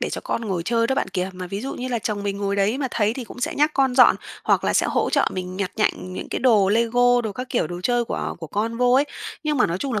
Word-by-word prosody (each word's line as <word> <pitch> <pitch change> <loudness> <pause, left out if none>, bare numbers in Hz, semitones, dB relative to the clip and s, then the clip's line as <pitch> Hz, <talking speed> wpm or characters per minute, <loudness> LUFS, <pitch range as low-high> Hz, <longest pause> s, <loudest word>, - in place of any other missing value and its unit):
để - - -2
cho - - -4
con - - -2
ngồi 190 -5 -2
chơi 230 +4 +1
đó, 265 - 0
bạn - - -1
kìa. 185 0 -2
Mà 185 0 -7
ví 195 +3 -5
dụ 270 +4 -5
như 255 - -5
là 240 -2 -1
chồng 210 -2 -3
mình 200 -1 -3
ngồi 200 0 -1
đấy 205 +6 +1
mà 275 -2 -1
thấy 215 -2 +1
thì 255 - -5
cũng 245 - -11
sẽ - - -1
nhắc 300 +2 +3
con 265 -2 +2
dọn, 250 -1 +7 0.3
hoặc - - +2
là - - +1
sẽ - - +2
hỗ - - 0
trợ - - +2
mình 185 0 -5
nhặt 195 -1 -2
nhạnh 200 -4 -1
những - - -6
cái - - -1
đồ 220 -6 +4
Lego 245 +3 +3
đồ 220 -3 -4
các 250 +4 -6
kiểu, 240 - +1
đồ 175 +2 -6
chơi 240 +3 +1
của - - -3
của 165 - -6
con 220 +7 -2
vô 245 0 +3
ấy. 275 +2 +5 0.4
Nhưng 305 -1 0
mà 250 - +4
nói 170 +2 -2
chung 270 +5 -3
là 215 - 0
225 Hz, 310 wpm, -23 LUFS, 195-250 Hz, 0.4 s, dọn